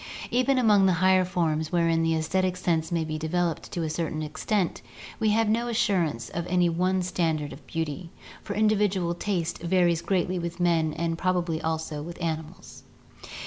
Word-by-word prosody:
Even 255 +2 +2
among 210 -5 +5
the 185 - +4
higher 185 +1 +4
forms 165 -4 -1
wherein 165 -2 +2
the 165 0 +2
aesthetic 185 +3 0
sense 170 -2 0
may 165 -2 0
be 155 0 -4
developed 165 0 -1
to 170 - -2
a 160 - -2
certain 155 -1 -2
extent, 165 +5 -1 0.4
we 220 -1 +2
have 220 +1 +2
no 230 +3 +1
assurance 190 - 0
of 170 0 -4
any 180 -1 +3
one 185 +2 +1
standard 160 -5 -1
of 135 - -14
beauty, 165 +1 -4 0.3
for 205 - -5
individual 205 -5 +2
taste 175 -2 -2
varies 170 -1 +2
greatly 185 -1 0
with 170 +1 -5
men 165 -3 +2
and 165 +1 -2
probably 175 -3 0
also 160 -2 -3
with 170 +3 -8
animals. 160 -2 -5
175 Hz, 170 wpm, -26 LUFS, 160-185 Hz, 0.4 s, among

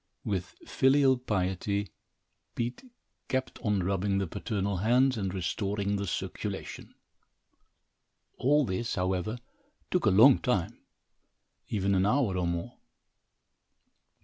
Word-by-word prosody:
With 95 -2 -3
filial 135 0 +4
piety, 100 -4 -2 0.6
Pete 120 - -3 0.4
kept 130 0 -2
on 105 -4 0
rubbing 100 +1 0
the 100 - 0
paternal 100 +2 -2
hands 125 +7 +3
and 95 -4 -2
restoring 100 +3 -2
the 100 0 -2
circulation. - - -5 1.4
All 145 +2 +3
this, 115 +5 -2
however, 95 +4 -1 0.5
took 180 -10 +1
a - - +7
long 115 +7 +7
time, 100 -10 -1 0.9
even 100 -2 0
an 95 +1 +3
hour 120 -4 +2
or 90 -1 0
more. 85 0 -4
100 Hz, 110 wpm, -29 LUFS, 95-125 Hz, 1.4 s, a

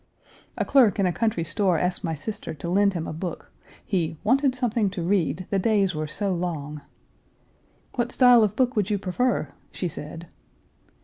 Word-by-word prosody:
A - - 0
clerk 255 -7 +4
in 195 - +2
a 180 - +1
country 215 -6 0
store 180 +1 +1
asked 180 +3 -1
my 165 -3 -1
sister 205 +2 -6
to 165 +3 -6
lend 200 +1 +3
him 165 -1 -2
a - - -5
book, 165 +1 -6 0.3
he 170 -5 -1
"wanted 260 +4 +3
something 235 -4 0
to 185 -3 -5
read; 185 0 0
the 195 - +2
days 200 -2 +2
were 155 0 -3
so 195 +5 -2
long." 155 -4 -4 1.1
"What 240 -1 -1
style 245 -3 +6
of 210 -1 0
book 255 0 +1
would 210 -2 +1
you 210 - +1
prefer?" 200 +6 -1 0.2
she 180 - -3
said. 165 +1 -7
195 Hz, 180 wpm, -25 LUFS, 170-220 Hz, 1.1 s, style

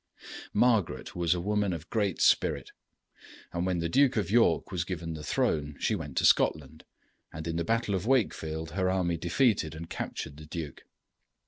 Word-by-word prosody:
] - - -10
Margaret 115 -7 +1
was 85 0 +2
a - - -2
woman 105 +1 0
of 80 0 -8
great 100 -6 0
spirit, - - +2 0.8
and 85 +2 -1
when 90 -1 0
the 85 0 -1
Duke 135 +7 +3
of 100 -2 -1
York 115 +1 +3
was 90 -4 -1
given 85 -2 -5
the 80 - -7
throne 75 0 0
she - - +1
went - - -5
to - - +3
Scotland, 75 +1 +2 0.5
and 80 +1 -7
in 85 - -2
the 85 - 0
battle 115 +2 0
of 95 +3 -2
Wakefield 80 -11 0
her 95 +2 0
army 90 -2 0
defeated 85 - +1
and 80 +1 -8
captured 70 - -5
the 75 0 -11
duke. 80 -4 -7
85 Hz, 185 wpm, -29 LUFS, 80-105 Hz, 0.8 s, Duke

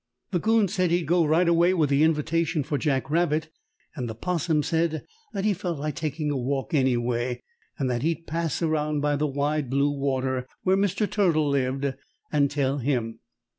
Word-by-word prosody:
The 180 - +1
'Coon 220 +2 +3
said 185 -2 0
he'd 175 0 +1
go 175 +1 +3
right 165 +4 +3
away 170 +2 +4
with 155 -5 +1
the 140 +1 +3
invitation 160 0 +1
for 145 0 -2
Jack 135 -3 0
Rabbit, 160 -1 +1 0.5
and 125 -4 -4
the 110 - -5
'Possum 160 +2 0
said 160 -1 0 0.3
that 195 0 -3
he 215 - +3
felt 175 -3 -3
like 150 +1 -3
taking 150 0 -2
a - - -1
walk 135 +5 -2
anyway, 125 -3 0 0.3
and 135 - -1
that 120 -2 -1
he'd 165 +3 -1
pass 165 +1 -2
around 150 -2 0
by 145 0 +1
the 150 +1 0
Wide 145 0 -1
Blue 140 +2 +2
Water 130 -2 -1 0.2
where 190 0 +3
Mr. 200 +1 +1
Turtle 170 -8 +2
lived, 135 0 0 0.4
and 145 -2 +3
tell 140 -1 0
him. 115 -4 -1
150 Hz, 185 wpm, -26 LUFS, 135-170 Hz, 0.5 s, away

